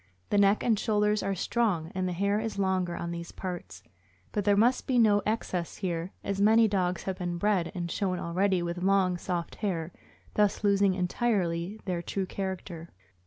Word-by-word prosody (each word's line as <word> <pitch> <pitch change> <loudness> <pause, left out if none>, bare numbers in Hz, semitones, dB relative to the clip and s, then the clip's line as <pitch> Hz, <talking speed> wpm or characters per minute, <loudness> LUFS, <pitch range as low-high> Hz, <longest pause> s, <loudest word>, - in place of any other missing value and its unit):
The 205 - +4
neck 200 +1 +4
and 225 -4 +2
shoulders 210 -1 +2
are 195 0 -1
strong, 185 -5 0
and 185 0 -1
the - - -1
hair 200 +3 +1
is 225 -1 -4
longer 185 -3 0
on 170 0 -4
these 170 0 -6
parts, 175 - -7 0.5
but 205 -2 -2
there 205 -1 +4
must 240 +5 +3
be 255 - +2
no 210 -3 +5
excess 185 -6 -2
here, 175 -2 -3
as 200 0 -2
many 220 +2 +6
dogs 185 -3 0
have 190 -1 -4
been 175 -1 -2
bred 190 -2 +1
and 175 -2 -3
shown 185 -3 -1
already 180 +2 +1
with 175 +1 -3
long, 190 -1 +3
soft 175 -2 -3
hair, 175 -6 -2 0.4
thus 210 0 +1
losing 200 -2 +3
entirely 185 -1 -1
their 180 -3 -2
true 195 +2 -2
character. 185 -3 -5
190 Hz, 180 wpm, -29 LUFS, 175-205 Hz, 0.5 s, many